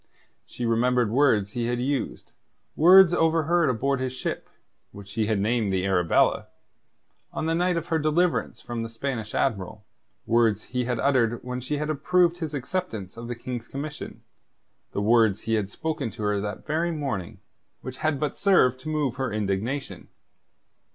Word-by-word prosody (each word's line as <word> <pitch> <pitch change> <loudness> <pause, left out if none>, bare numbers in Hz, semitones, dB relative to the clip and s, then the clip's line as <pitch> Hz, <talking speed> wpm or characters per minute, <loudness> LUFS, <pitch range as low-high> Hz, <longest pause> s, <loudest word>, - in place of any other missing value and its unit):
She 120 - -5
remembered 120 0 +2
words 115 -6 +3
he 120 +1 -2
had 120 0 -1
used 135 +2 -3 0.4
words 180 +2 +7
overheard 165 -1 +2
aboard 135 +3 0
his 130 -1 -2
ship 130 - -4 0.4
(which 100 0 -12
he 110 -1 0
had 110 -2 +1
named 110 +1 +1
the 95 -1 0
Arabella) 90 -3 +2 0.8
on - - -3
the 165 - +1
night 175 +1 +1
of 165 +1 -4
her 165 -2 +1
deliverance 155 +3 +1
from 120 -1 -5
the 115 - -4
Spanish 115 -2 -4
admiral; 105 -4 -2 0.4
words 115 -3 +2
he 125 -1 -3
had 125 0 -1
uttered 120 -4 +1
when 125 0 -4
she 145 +4 -3
had 150 +1 -2
approved 175 +4 +2
his 160 -4 -4
acceptance 130 - -4
of 115 0 -8
the 120 - -4
King's 120 0 -6
commission; 150 +2 -7 0.7
the 100 - -2
words 110 -2 +3
he 115 - -2
had 105 -3 0
spoken 155 0 -3
to 110 +1 -8
her 105 -1 0
that 105 0 -5
very 160 +3 0
morning, 135 - -4 0.4
which 130 0 -7
had 155 -3 0
but 150 - -2
served 130 -11 +4
to 145 +4 -7
move 145 -5 -1
her 130 -3 -2
indignation. 110 +6 -3
125 Hz, 170 wpm, -25 LUFS, 110-150 Hz, 0.8 s, words